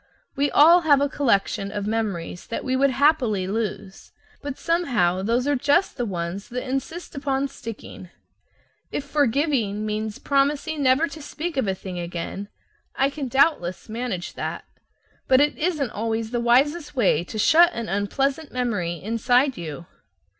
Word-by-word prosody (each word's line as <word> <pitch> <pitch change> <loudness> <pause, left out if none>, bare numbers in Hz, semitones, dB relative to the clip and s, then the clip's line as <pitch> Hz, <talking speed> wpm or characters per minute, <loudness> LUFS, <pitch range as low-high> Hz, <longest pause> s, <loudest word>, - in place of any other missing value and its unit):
We 280 +1 +1
all 335 +4 +7
have 295 -4 +4
a 285 - +2
collection 200 -8 0
of 205 -1 -3
memories 205 -6 -3
that - - -4
we 260 -1 0
would 275 +1 +3
happily 260 -8 +2
lose, 195 -1 -4 0.3
but 285 -2 -5
somehow 245 - +1
those 235 +5 0
are 290 0 +2
just 290 +8 +2
the 245 - -2
ones 180 +1 -4
that 250 +2 -4
insist 270 +7 -4
upon 275 -1 -1
sticking. 225 -7 -9 0.8
If - - -3
"forgiving" 275 -7 0
means 215 0 -3
promising 290 +2 0
never 270 +4 +3
to 320 - -10
speak 315 +4 -5
of 265 -6 0
a 190 - 0
thing 185 -1 -7
again, 175 +3 -5 0.5
I 275 +1 +2
can 280 -2 -4
doubtless 260 - +1
manage 220 -6 -4
that. - - -5 0.6
But 260 0 +5
it 295 +1 +3
isn't 305 -7 0
always 225 +1 -2
the 240 - -1
wisest 290 +6 +2
way 190 - +2
to 215 - -7
shut 335 +10 +6
an 230 -1 -4
unpleasant 270 +10 -1
memory 215 -9 -1
inside 245 - +1
you. 170 -1 -7
250 Hz, 155 wpm, -24 LUFS, 205-285 Hz, 0.8 s, all